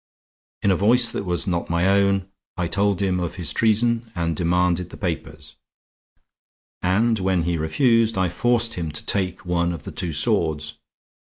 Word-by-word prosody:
In 100 - +3
a - - +3
voice 115 +6 +4
that - - -4
was 90 -1 -1
not 85 -3 -2
my 85 +2 +1
own, 100 -1 +2 0.3
I 90 - 0
told 100 +2 0
him 95 -2 0
of 85 -1 -3
his 85 -5 -2
treason 115 +1 +1
and 85 -2 -1
demanded 90 +1 +1
the - - -11
papers; 80 -4 -5 1.3
and 110 +5 +2
when 95 -2 +1
he 85 +1 0
refused, 115 - +2
I 95 -1 +2
forced 120 +5 0
him 80 -3 -4
to 75 - -5
take 95 -3 -1
one 85 -1 0
of 85 - -7
the - - -7
two 85 - -2
swords. 80 -4 0
90 Hz, 170 wpm, -22 LUFS, 85-105 Hz, 1.3 s, voice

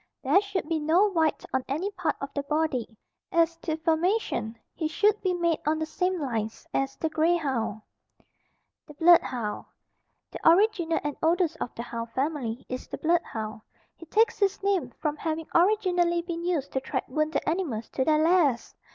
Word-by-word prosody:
There 390 - +4
should 395 -5 -3
be 325 -1 0
no 345 +7 +3
white 320 -4 +1
on 260 -1 +1
any 325 +9 -2
part 365 -4 -1
of 275 0 -6
the 285 - -1
body. 280 -6 -1 0.3
As 335 0 +3
to 320 -1 -3
formation, 320 - 0 0.2
he 315 - -2
should 420 +6 +2
be 375 - +1
made 340 -2 +1
on 310 +1 +2
the 315 - -1
same 360 +3 -1
lines 225 -6 -3
as 270 0 -1
the 320 - -1
grey 320 +2 +2
hound. 260 -9 -2 1.0
THE 300 - -12
BLOOD 340 +3 +7
HOUND. 225 -5 -4 0.7
The - - +3
original 345 -2 +3
and 295 -1 -2
oldest 335 0 +2
of - - -4
the 235 - -5
hound 230 -1 -5
family 260 -4 -2
is 255 0 -6
the - - -6
blood 340 +2 +2
hound. 220 -4 -6 0.3
He 335 - -13
takes 445 +6 +2
his 400 -1 +1
name 385 -10 +1
from 300 -1 -1
having 320 +1 -3
originally 355 -2 +3
been 340 -1 -5
used 325 -6 -1
to 265 - -1
track 260 -1 -3
wounded 305 +4 -1
animals 305 -10 -2
to 260 - -1
their 305 +2 +3
lairs. 320 -8 +2
320 Hz, 180 wpm, -27 LUFS, 275-350 Hz, 1.0 s, BLOOD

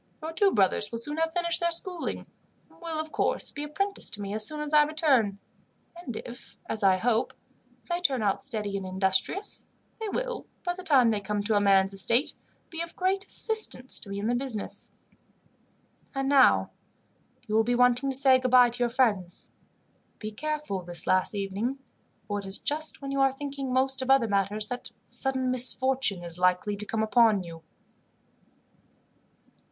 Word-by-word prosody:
Your 320 +1 -5
two 390 +4 +3
brothers 205 0 +1
will 230 - -3
soon 295 +7 -2
have 325 0 0
finished 340 -1 0
their 340 - +1
schooling, 345 +1 -2 0.5
and - - -23
will, 330 -2 -4
of 315 0 -5
course, - - 0
be 290 - -7
apprenticed 395 - -2
to 205 - -9
me 200 0 -5
as 215 0 +5
soon 305 -1 -3
as 300 0 -4
I 300 - +7
return; 285 - +1 0.6
and 335 -9 -8
if, 245 0 -11
as 220 - -3
I 190 -2 +4
hope, 225 +3 0 0.5
they 345 0 -2
turn 265 -9 0
out 200 -2 0
steady 215 -7 0
and 195 - -6
industrious; 190 - 0 0.3
they 440 -1 -4
will, - - -4 0.2
by 355 - -1
the 370 - -9
time 265 -9 +4
they 210 -2 -2
come 205 +1 -3
to 210 0 +2
man's 195 -1 +3
estate, 230 +8 +2 0.4
be 330 0 -4
of 335 0 -7
great 385 +2 -1
assistance 440 - +2
to 200 - -12
me 200 - -5
in 200 - -4
the 235 - +1
business. 245 -4 -3 1.3
"And 270 0 -1
now, 275 -2 +4 0.7
you 215 - -6
will 220 +1 +4
be 245 +2 0
wanting 250 +2 +2
to 265 - +5
say 265 -1 +5
goodbye 250 -1 +4
to 245 - -5
your 240 -1 +1
friends. 210 -8 -1 0.7
Be 215 0 -7
careful 300 -4 -4
this 175 -1 -3
last 185 +3 +1
evening, 200 +7 -3 0.5
for 205 -1 -2
it 200 - -8
is 195 - 0
just 305 0 -1
when 275 - -5
you 275 - -2
are 270 -1 +3
thinking 275 -1 -6
most 260 +1 +1
of 260 - -4
other 270 -4 +4
matters, 205 +1 -1
that 245 -1 -6 0.2
sudden 260 -1 +2
misfortune 255 -5 +2
is 170 0 -8
likely 180 +3 +1
to 205 +1 -7
come 220 +1 -1
upon 220 -3 +3
you." 165 -1 -11
250 Hz, 180 wpm, -27 LUFS, 205-295 Hz, 1.3 s, I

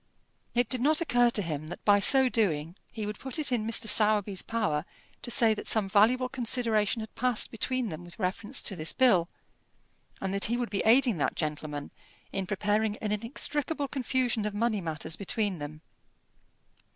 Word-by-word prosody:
It 245 -1 +2
did 255 0 -1
not 305 +4 +3
occur 245 -7 +3
to 210 -3 -2
him 155 -2 -4
that 175 - -9
by 205 -1 +5
so 265 +6 +5
doing 170 -9 -1 0.2
he 220 -2 -5
would 210 -1 -6
put 265 +2 -1
it 300 -3 +1
in 225 -3 0
Mr. 225 0 0
Sowerby's 210 -2 +2
power 210 -10 -1 0.4
to - - -6
say 230 -2 +4
that - - -6
some 215 -3 +2
valuable 225 +6 +3
consideration 230 -3 +1
had 220 - -9
passed 250 -2 0
between 245 +1 -2
them 160 0 -7
with 175 -1 -12
reference 195 +2 -1
to 195 - -2
this 155 -1 -2
bill, 185 -10 +3 0.9
and 195 0 -3
that 200 - +4
he 235 +2 0
would 245 -3 -3
be 200 - 0
aiding 240 -2 +4
that 145 - -1
gentleman 150 -2 -4 0.4
in 195 -1 -3
preparing 210 +1 0
an 210 - -4
inextricable 280 +7 -1
confusion 255 -4 -1
of 205 - -5
money 220 -1 0
matters 160 -1 -4
between 200 -2 -2
them. 150 +1 -8
215 Hz, 180 wpm, -28 LUFS, 190-245 Hz, 0.9 s, by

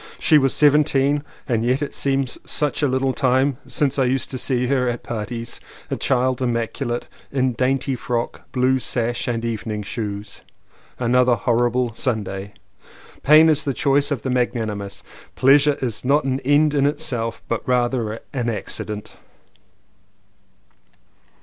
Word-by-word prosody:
She 155 -2 +4
was 135 -1 +2
seventeen 145 -1 +3 0.2
and 115 -4 0
yet 130 +4 +1
it 145 - -5
seems 135 -2 0
such 150 0 0
a 145 - +3
little 130 0 0
time 130 0 +2
since 140 -1 0
I 130 - +3
used 130 +1 -1
to 130 - -4
see 125 -1 0
her 125 -1 +1
at 120 0 -4
parties 115 +1 -5 0.2
— - - -21
a - - +1
child 130 0 0
im 120 -2 +1
maculate, 120 +1 -2 0.3
in 130 -2 +1
dainty 130 +2 0
frock, 120 -1 -4
blue 130 +1 +2
sash 120 0 -1
and 115 -1 -2
evening 110 -2 -3
shoes. 100 -1 -6 0.6
Another 125 0 +3
horrible 120 +1 +1
Sunday. 100 -5 -3 0.7
"Pain 155 +3 +7
is 150 -2 +3
the 140 -3 -2
choice 140 0 +2
of 140 -6 -3
the 130 - -2
magnanimous." 110 -5 -2 0.3
"Pleasure 140 +2 +4
is 115 -4 -3
not 140 +4 +3
an 130 0 -1
end 145 +3 +3
in 140 -1 +3
itself 135 -7 -2
but 115 - -1
rather 120 -3 0
an 125 -3 -1
accident." 105 0 -5
125 Hz, 150 wpm, -21 LUFS, 115-140 Hz, 0.7 s, Pain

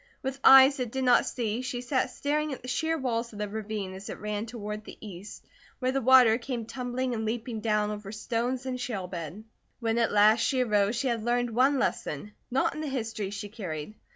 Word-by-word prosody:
With 265 +1 -3
eyes 270 +1 +9
that 250 -4 -3
did 265 +1 -2
not 250 -1 +4
see, 230 -1 -2
she 250 -1 -4
sat 260 +1 0
staring 300 +3 -1
at 265 - -7
the - - -8
sheer 320 +5 0
walls 235 -4 -2
of - - -9
the 210 0 -2
ravine 210 -2 -4
as 190 +1 -9
it - - -5
ran 210 +1 -3
toward 210 -2 -6
the - - -11
east, 200 -1 -10 0.3
where 255 0 0
the 270 +1 0
water 250 -2 +6
came 240 -2 -4
tumbling 250 +1 -3
and 220 -1 -2
leaping 225 +1 -3
down 210 -1 +1
over 210 -1 -6
stones 240 +4 -2
and 255 -1 -3
shale 215 -7 -3
bed. 175 +2 -7 0.4
When 230 -1 0
at 230 - +2
last 210 +2 +5
she 260 +2 +1
arose 210 -1 +2
she 265 +3 -1
had 230 -3 -1
learned 240 0 0
one 260 +5 +3
lesson, 180 - -2 0.2
not 260 +2 +1
in 310 - -5
the 310 - -3
History 225 -6 -3
she 205 +1 -5
carried. 185 -5 -6
230 Hz, 215 wpm, -28 LUFS, 210-255 Hz, 0.4 s, eyes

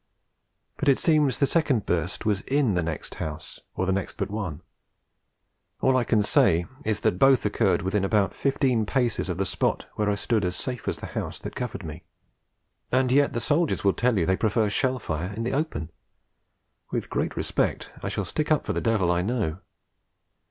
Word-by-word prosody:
But 145 - +1
it 135 - +5
seems 150 -5 +3
the 140 - +3
second 140 - +1
burst 90 +5 -1
was 105 -2 +1
in 135 -6 +2
the 90 - +1
next 80 -2 -4
house, 75 -1 -6 0.2
or 95 - -1
in 95 - +2
the 100 - +1
next - - -11
but 100 0 -3
one. 90 -7 -4 1.2
All 130 0 +3
I 130 - +3
can 110 -3 +2
say 85 -4 +3 0.2
is 110 -5 -1
that 90 - +1
both 135 -3 +5
occurred 100 -4 +2
within 95 +1 0
about 100 0 +2
fifteen 130 -5 +1
paces 120 -6 0
of 90 - -2
the 95 - 0
spot 95 - 0
where 105 -1 0
I 105 - +2
stood 110 +1 0
as 90 0 -1
safe 125 +5 -4
as - - -1
the - - -7
house - - -3
that - - -7
covered 125 -5 -4
me. 80 +2 -7 0.9
And 130 0 +2
yet 140 +2 +4
the 120 - -1
soldiers 150 +6 +1
tell 125 -3 +2
you 85 - +2
they 95 - +2
prefer 110 -1 +1
shell 130 +3 +1
fire 85 -4 -3
in 115 +3 -4
the 120 - -1
open! 135 - -2 1.0
With - - -3
great - - -1
respect, - - -1
I - - -3
shall - - -2
stick 155 0 -2
up 155 - +3
for - - -1
the - - -1
devil 105 -7 +2
I 90 0 +2
know. 100 -5 -1
105 Hz, 200 wpm, -26 LUFS, 95-130 Hz, 1.2 s, it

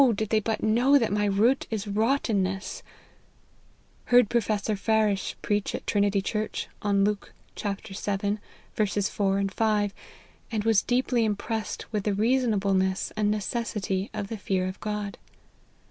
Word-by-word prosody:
did 215 0 -2
they 220 - +3
but 220 +1 -2
know 245 +6 +5
that 230 -6 +1
my 210 0 +1
root 215 +7 +2
is 215 -2 -3
rottenness 205 -3 0 0.4
!" - - -35
" - - -35
Heard 245 -4 +5
Professor 215 -2 +1
Parish 210 -1 +1
preach 205 -1 0
at - - -6
Trinity 200 -1 +2
Church, 215 +1 -2
on 200 -1 +2
Luke 205 0 -1 0.2
xii. 200 0 -2 0.4
4, 200 -1 0
5, 205 0 +1 0.6
and 215 -2 -1
was 225 -2 +4
deeply 245 -1 +1
impressed 215 0 -2
with 210 -2 -1
the 205 -2 +1
reasonableness 200 -5 +1
and 210 -1 +1
necessity 210 -2 -2
of 210 -2 -4
the 225 - -4
fear 185 -2 0
of 185 +1 -6
God. 210 -1 -4
210 Hz, 140 wpm, -27 LUFS, 200-220 Hz, 0.6 s, know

